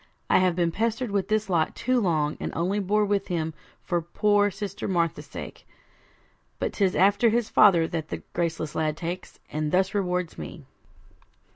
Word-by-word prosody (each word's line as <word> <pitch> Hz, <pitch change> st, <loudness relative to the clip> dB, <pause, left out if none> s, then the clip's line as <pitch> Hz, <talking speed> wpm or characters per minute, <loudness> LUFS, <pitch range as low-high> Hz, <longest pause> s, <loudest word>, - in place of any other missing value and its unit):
I -, -, +6 dB
have 185 Hz, -2 st, +2 dB
been 170 Hz, -1 st, +1 dB
pestered 225 Hz, +4 st, -1 dB
with 195 Hz, -2 st, 0 dB
this 215 Hz, -1 st, +1 dB
lot 170 Hz, -4 st, +1 dB
too 255 Hz, 0 st, +1 dB
long, 155 Hz, -6 st, +1 dB
and -, -, -3 dB
only 185 Hz, +5 st, 0 dB
bore 210 Hz, +2 st, +2 dB
with 200 Hz, -1 st, 0 dB
him 160 Hz, -2 st, -2 dB, 0.3 s
for 175 Hz, -1 st, 0 dB
poor 205 Hz, +4 st, +2 dB
sister 200 Hz, 0 st, -5 dB
Martha's 170 Hz, -2 st, 0 dB
sake; -, -, -9 dB, 0.9 s
but -, -, -2 dB
'tis 195 Hz, -3 st, +1 dB
after 200 Hz, +5 st, +4 dB
his 230 Hz, 0 st, 0 dB
father 175 Hz, -6 st, +6 dB
that 160 Hz, -2 st, -4 dB
the -, -, -6 dB
graceless 165 Hz, -2 st, -2 dB
lad 155 Hz, -1 st, -1 dB
takes, 175 Hz, +2 st, -5 dB
and 155 Hz, 0 st, -2 dB
thus 190 Hz, +1 st, +2 dB
rewards 180 Hz, -4 st, -1 dB
me.' 75 Hz, -, -8 dB
185 Hz, 170 wpm, -26 LUFS, 165-205 Hz, 0.9 s, I